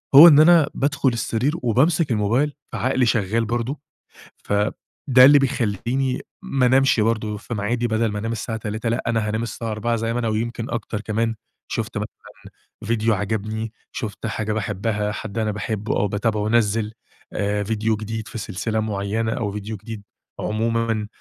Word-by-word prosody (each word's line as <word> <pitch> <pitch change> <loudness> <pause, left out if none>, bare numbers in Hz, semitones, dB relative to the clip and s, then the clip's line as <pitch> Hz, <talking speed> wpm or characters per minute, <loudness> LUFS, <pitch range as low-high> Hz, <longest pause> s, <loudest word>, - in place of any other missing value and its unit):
هو 160 +5 +12
إن 145 -1 +7
أنا 165 -2 +6
بادخل 140 -1 +1
السرير 120 +4 -1
وبامسك 145 +5 +2
الموبايل، 115 +8 +1 0.2
فعقلي 130 0 +1
شغال 115 0 +1
برضه 120 +5 -2 0.7
فده 105 +1 +1 0.5
اللي 145 +1 +8
بيخلّيني 125 +1 -1 0.2
ما 135 -2 +1
انامشِ 130 -1 +4
برضه 110 -1 0
في 120 - -7
ميعادي 115 +3 -1
بدل 110 0 +1
ما 105 - -3
أنام 115 +2 -3
الساعة 115 0 -3
03:00 110 +2 -3
لأ 120 - -1
أنا 115 -2 +1
هانام 110 +2 -1
الساعة 115 -1 -4
04:00 115 +2 -1
زي 115 +1 -1
ما 120 - -1
أنا، 115 - -1
ويمكن 115 +2 -2
أكتر 110 -2 -3
كمان، 115 +1 -1 0.3
شُفت - - -3
م - - -1 0.8
ڤيديو 115 0 +1
عَجبني 110 +2 -2 0.2
شُفت 110 0 -5
حاجة 110 -1 -2
باحبها 105 0 -1
حد 100 +2 -6
أنا 110 -1 0
باحبه 105 0 -2
أو 105 - +2
باتابعه 105 +1 -1
نزّل 110 -1 +1 0.4
آآ 105 0 0
ڤيديو 110 +1 0
جديد 110 +1 -5
في 115 - -7
سلسلة 110 +1 -2
مُعينة 110 +1 -1
أو 105 -4 -2
ڤيديو 105 +1 -5
جديد 110 0 -8 0.4
عمومًا 115 0 0
110 Hz, 160 wpm, -22 LUFS, 105-120 Hz, 0.8 s, هو